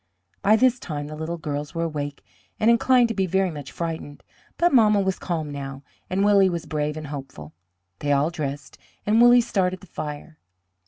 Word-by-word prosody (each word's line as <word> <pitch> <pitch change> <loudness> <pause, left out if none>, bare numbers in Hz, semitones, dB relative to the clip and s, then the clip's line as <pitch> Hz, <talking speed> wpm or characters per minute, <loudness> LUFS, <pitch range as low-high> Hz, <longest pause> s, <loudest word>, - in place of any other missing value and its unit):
By 210 +2 +5
this 250 +1 +3
time 145 -7 -5
the 155 +1 -7
little 160 +2 -4
girls 150 0 -5
were 165 - -1
awake 145 -3 -4 0.3
and 225 +2 +5
inclined 245 +1 +4
to - - -1
be 190 -3 0
very 190 +1 +1
much 145 -3 -8
frightened, 160 -4 -5 0.3
but 345 -1 +3
mamma 215 -4 +5
was 190 -1 -1
calm 160 -4 -3
now, 135 -1 -7 0.3
and 195 +2 +1
Willie 200 -2 +5
was 170 -2 -4
brave 150 0 -2
and 155 - -6
hopeful. 135 - -8 0.5
They 145 - -1
all 145 +3 +2
dressed, 145 -4 -5 0.3
and 220 +3 +4
Willie 240 0 +7
started 185 -5 -1
the - - -14
fire. 155 -1 -7
165 Hz, 190 wpm, -24 LUFS, 145-200 Hz, 0.5 s, Willie